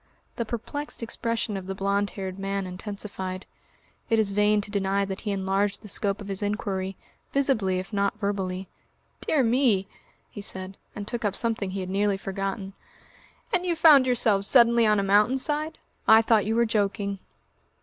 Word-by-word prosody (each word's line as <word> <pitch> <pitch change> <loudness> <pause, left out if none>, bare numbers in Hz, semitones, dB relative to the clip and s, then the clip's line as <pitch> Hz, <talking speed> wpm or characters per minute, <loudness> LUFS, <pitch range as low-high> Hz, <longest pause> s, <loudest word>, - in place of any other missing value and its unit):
The 235 - -1
perplexed 245 +5 -5
expression 230 -1 -2
of 190 -1 -6
the 195 - -3
blond 200 +1 0
haired 190 -1 -5
man 195 0 -2
intensified. 190 0 -6 0.6
It 225 - +3
is 215 -2 +2
vain 210 +1 +3
to 205 - -9
deny 200 -1 +1
that 195 0 -5
he 210 - -2
enlarged 195 +2 0
the - - -9
scope 200 0 -1
of 200 - -8
his 195 0 -4
inquiry, 195 -2 -2 0.3
visibly 235 -10 +1
if 185 +4 -6
not 200 0 0
verbally. 190 -3 -2 0.6
"Dear 295 -4 +3
me!" 230 -5 +2 0.4
he 205 - -7
said, 190 -1 -2 0.2
and 205 -1 -6
took 240 0 -4
up 205 -3 0
something 225 -4 0
he 190 +1 -4
had 185 - -5
nearly 200 0 +1
forgotten. 195 0 -4 0.8
"And 365 -1 +2
you 350 -2 0
found 300 -5 +7
yourselves 220 -5 +2
suddenly 235 -2 +5
on 210 -1 +4
a - - +1
mountain 210 +6 +4
side?... 300 +3 -2 0.3
I 220 +1 +8
thought 220 -3 +3
you 220 - +1
were 235 0 +4
joking." 200 -2 -1
205 Hz, 175 wpm, -26 LUFS, 195-230 Hz, 0.8 s, I